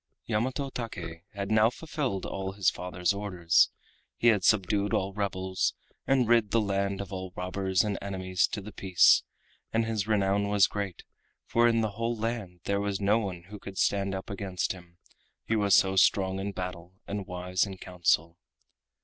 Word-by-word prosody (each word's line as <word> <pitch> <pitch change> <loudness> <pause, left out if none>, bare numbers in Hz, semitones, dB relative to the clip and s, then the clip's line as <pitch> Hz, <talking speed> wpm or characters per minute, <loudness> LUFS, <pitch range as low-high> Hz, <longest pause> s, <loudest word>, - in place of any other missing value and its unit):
Yamato 130 +5 -1
Take 85 -9 -6
had 100 +1 -3
now 110 +1 +5
fulfilled 135 - -3
all 95 0 -4
his 100 -3 +2
father's 90 0 -1
orders, 90 -5 +2 0.5
he 120 - +4
had 105 -5 +3
subdued 100 0 +2
all 95 +1 -1
rebels, 95 -2 -1 0.3
and 130 -3 +3
rid 115 -2 +4
the 115 - +3
land 100 -1 -1
of 100 0 -7
all 95 -1 -5
robbers 95 0 0
and 105 -2 -2
enemies 95 -2 0
to 105 - -5
the 105 +2 -9
peace, 95 -3 +5 0.5
and 115 0 +1
his 110 -2 -2
renown 100 -1 +2
was 100 -1 +5
great, 100 -4 -4 0.4
for 120 0 +3
in 115 -1 +3
the 110 -2 -1
whole 115 +3 -2
land 105 -6 -4
there 100 0 0
was 100 -1 -1
no 105 +3 +3
one 95 -5 -5
who 105 0 -8
could 95 -1 -9
stand 100 -1 +1
up 95 +1 -6
against 95 -2 -2
him, 90 -2 -11 0.5
he 115 - 0
was 100 -2 +4
so 95 0 +4
strong 95 0 +3
in 100 +1 -3
battle 90 -1 -6
and 100 -1 -4
wise 90 0 -1
in 95 -1 -7
council. 85 -2 0
100 Hz, 175 wpm, -29 LUFS, 95-105 Hz, 0.5 s, now